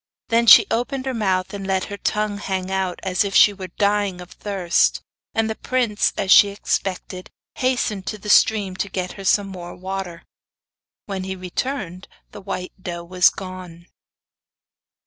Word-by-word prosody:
Then 235 +1 +2
she - - +10
opened 260 +3 -1
her 265 - -2
mouth 190 -5 -1
and 195 -1 -6
let 190 -1 0
her 200 - -6
tongue 210 0 -1
hang 190 -2 -3
out, 190 -2 -2
as 185 -1 +1
if 200 -1 -4
she 205 - +7
were 190 -2 -7
dying 200 0 0
of 180 0 -11
thirst, 190 -4 +1 0.4
and 225 0 +1
the 220 - -2
prince, 235 -3 0
as 195 -2 0
she 205 - +8
expected, 190 -2 -3 0.3
hastened 240 -7 -1
to 215 - -3
the 210 - -11
stream 205 -3 +3
to 200 - -2
get 185 -1 -3
her 195 - -10
some 200 +1 +3
more 175 -2 -8
water. 185 -2 -6 0.8
When 195 -2 -4
he 190 0 -4
returned, 185 0 -4 0.2
the 205 - -10
white 190 -2 -5
doe 170 -1 -5
was 180 +1 +4
gone. 185 -3 -9
195 Hz, 165 wpm, -21 LUFS, 185-210 Hz, 0.8 s, she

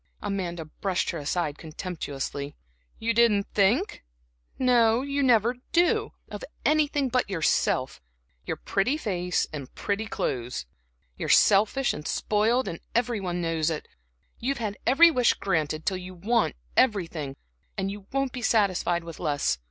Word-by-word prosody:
Amanda 180 -5 -3
brushed 180 +4 -2
her 170 - -5
aside 150 0 -2
contemptuously. 145 -4 -5 0.4
"You 230 +1 0
didn't 225 -4 +4
think? 220 - +2 0.5
no, 240 -1 +4
you 280 0 -1
never 240 -2 +3 0.2
do, 350 +1 +2
of - - -8 0.2
anything 295 -2 +2
but 250 -3 0
yourself, 155 - 0 0.4
your - - -3
pretty 225 +10 0
face 180 - -1
and 140 -4 -6
pretty 210 +2 -2
clothes! 125 - -3 0.5
You're - - -3
selfish 215 +6 +4
and 150 - -6
spoiled 225 +5 +1 0.3
every 240 -2 +1
one 180 -2 -3
knows 165 -1 0
it; 160 -2 -4 0.5
you've 275 +4 -1
had 215 -4 -3
every 330 +7 +7
wish 250 -5 +3
granted 155 -4 -1
till 190 - 0
you 185 0 -9
want 220 +6 +1 0.2
everything, 165 - +1 0.4
and 195 0 -1
you 200 -1 -9
won't 275 -1 0
be 250 - -6
satisfied 190 -6 +2
with 165 -1 -9
less. 145 - 0
200 Hz, 140 wpm, -27 LUFS, 165-240 Hz, 0.5 s, every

